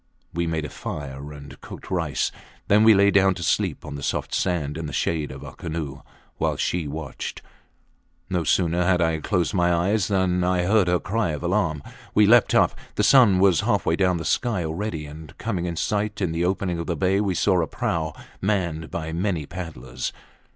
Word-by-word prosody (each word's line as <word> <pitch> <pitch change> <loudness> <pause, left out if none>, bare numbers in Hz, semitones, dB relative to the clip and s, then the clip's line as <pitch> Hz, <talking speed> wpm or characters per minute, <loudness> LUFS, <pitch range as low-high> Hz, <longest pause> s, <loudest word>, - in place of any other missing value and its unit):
We 85 0 -1
made 80 -2 -1
a - - -5
fire 70 0 -6
and 70 -1 -11
cooked - - -10
rice. 80 -8 0 0.4
Then 105 +2 +5
we 110 -1 +7
lay 100 +1 +5
down 95 -1 +4
to 85 - -6
sleep - - 0
on - - -6
the 70 - -6
soft - - -2
sand 80 -6 0
in 80 -1 -4
the 75 - -7
shade 80 -3 -1
of 65 - -9
our - - -9
canoe, 80 -5 -5 0.4
while - - 0
she 85 -4 -1
watched. 75 -1 -6 0.8
No 90 -2 -1
sooner 85 +3 +2
had 90 0 +3
I 80 -2 +1
closed 90 -1 0
my 90 -2 +2
eyes 90 +3 +1
than 95 -2 +1
I 90 0 +1
heard 100 0 +3
her 90 0 +2
cry 105 -1 -1
of 75 - -5
alarm. 85 -5 0 0.3
We 105 - +6
leaped 120 +2 +5
up. - - +4 0.2
The - - +1
sun 120 -9 +6
was 95 -3 +4
halfway 80 - +1
down 90 -1 +2
the 80 - -5
sky 115 -8 0
already, 80 -1 -3
and 75 +1 -11
coming 95 -6 -2
in 85 - -3
sight 105 +4 -1
in 90 -5 0
the 85 +2 0
opening 90 -2 -1
of 85 - -4
the 85 - -1
bay 95 +5 +2
we 95 -3 0
saw 90 0 +3
a 80 - -1
prau 80 -2 -2 0.3
manned 90 -6 -1
by 80 -1 -4
many 85 -3 -1
paddlers. 70 -8 -6
85 Hz, 200 wpm, -24 LUFS, 80-95 Hz, 0.8 s, we